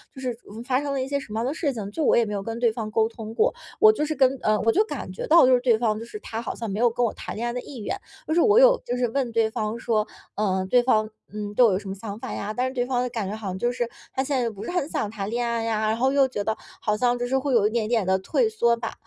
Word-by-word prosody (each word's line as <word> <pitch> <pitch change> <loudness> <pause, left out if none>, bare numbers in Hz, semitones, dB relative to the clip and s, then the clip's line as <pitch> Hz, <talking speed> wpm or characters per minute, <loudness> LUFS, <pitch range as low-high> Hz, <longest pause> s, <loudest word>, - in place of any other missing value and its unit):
就 265 - -9
是 245 -3 -3 0.3
发 260 +1 +1
生 285 -1 -2
了 265 - -1
一 - - -5
些 280 0 -1
什 215 - -10
么 220 - -1
样 235 - -1
的 275 - -1
事 295 -4 -1
情， 205 -3 -5
就 315 - -4
我 - - +5
也 235 - +4
没 210 - -4
有 200 - -2
跟 225 +3 -5
对 235 -2 +3
方 220 -1 -5
沟 220 +1 +2
通 225 -1 -8
过， 475 - +3 0.3
我 435 0 +8
就 305 -8 -1
是 310 0 -2
跟 265 0 +3
呃， 215 0 +2
我 225 - +3
就 415 - +3
感 - - -6
觉 - - -5
到 335 -5 +7
就 255 - +5
是， 250 - +5
对 240 -3 +3
方 220 -2 0
就 230 - -7
是 425 - -8
他 225 +1 -5
好 - - -5
像 230 -3 -5
没 200 +3 -3
有 240 0 +5
跟 240 +1 0
我 220 - -1
谈 - - -7
恋 235 +2 -3
爱 240 - -1
的 250 - -3
意 270 - -10
愿， 390 - -3 0.3
就 315 - 0
是 345 - +3
我 430 0 +5
有 - - +7
就 245 - -2
是 245 -1 +1
问 260 0 -1
对 225 -1 +2
方 215 +1 -2
说 215 -3 0 0.3
嗯 190 -3 0
对 245 -1 +5
方 215 -4 +2 0.2
嗯：’ 210 -1 -4
‘对 250 - +5
我 215 - +4
有 - - +1
什 200 - -11
么 - - -3
想 205 0 -7
法 - - -6
呀。’ 210 +1 -4
‘但 250 +1 0
是 260 - -5
对 245 -1 0
方 250 -1 0
的 250 - -2
感 220 -5 -3
觉 210 - -4
好 215 -3 -7
像 185 0 -3
就 240 - +1
是， 240 -1 -2 0.3
他 265 - 0
现 270 -2 0
在 235 - 0
不 205 -2 -9
是 - - -4
很 340 -4 -1
想 210 - -2
谈 200 -2 -4
恋 240 +1 -1
爱 230 -1 -1
呀， 220 -1 0
然 220 - +1
后 260 +2 +2
又 275 -1 +5
觉 210 -5 -4
得， 220 - 0 0.3
好 210 -1 +1
像 245 0 +2
就 245 - -1
是 265 +1 +1
会 270 0 -1
有 210 -3 +4
一 - - 0
点 225 -2 -1
点 225 -5 +1
地 190 0 +3
退 445 - +1
缩 235 - +2
吧。 230 -1 -5
235 Hz, 360 characters per minute, -25 LUFS, 215-260 Hz, 0.3 s, 我